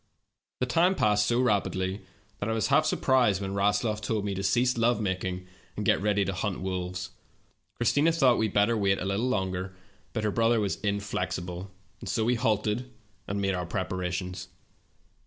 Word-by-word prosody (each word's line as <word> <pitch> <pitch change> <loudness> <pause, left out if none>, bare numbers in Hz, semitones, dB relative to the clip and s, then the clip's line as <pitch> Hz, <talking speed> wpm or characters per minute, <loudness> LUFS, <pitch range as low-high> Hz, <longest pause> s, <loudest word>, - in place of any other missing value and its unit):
The 125 - +1
time 170 +9 +3
passed 105 - +2
so 120 +2 +2
rapidly 100 -5 0 0.4
that 100 - -2
I - - +1
was 110 - 0
half 155 - +4
surprised 125 -8 +3
when 95 -1 -4
Rasloff 105 +2 +1
told 110 -1 -1
me 100 - -1
to 95 - -3
cease 120 +6 +2
love 115 +1 +2
making 95 -2 -2 0.3
and 105 - -2
get - - +3
ready 100 -1 +2
to 95 - -2
hunt 95 0 -2
wolves. 90 0 -4 0.6
Chris 120 - +1
tina 150 +3 +4
thought 135 -7 +3
we 110 - +2
had 100 - -8
better 105 +3 +4
wait 100 -2 +2
a - - -4
little 100 +6 0
longer, 95 -4 -2 0.4
but 110 - -3
her 105 - +1
brother 115 +2 +3
was 100 -2 -1
inflexible, 90 -3 -3 0.3
and - - -7
so 110 -3 0
we 120 - +3
halted 115 +1 0 0.4
and 100 +1 -2
made 100 -1 +1
our 90 -2 -3
preparations. 90 0 -3
100 Hz, 185 wpm, -28 LUFS, 95-115 Hz, 0.6 s, half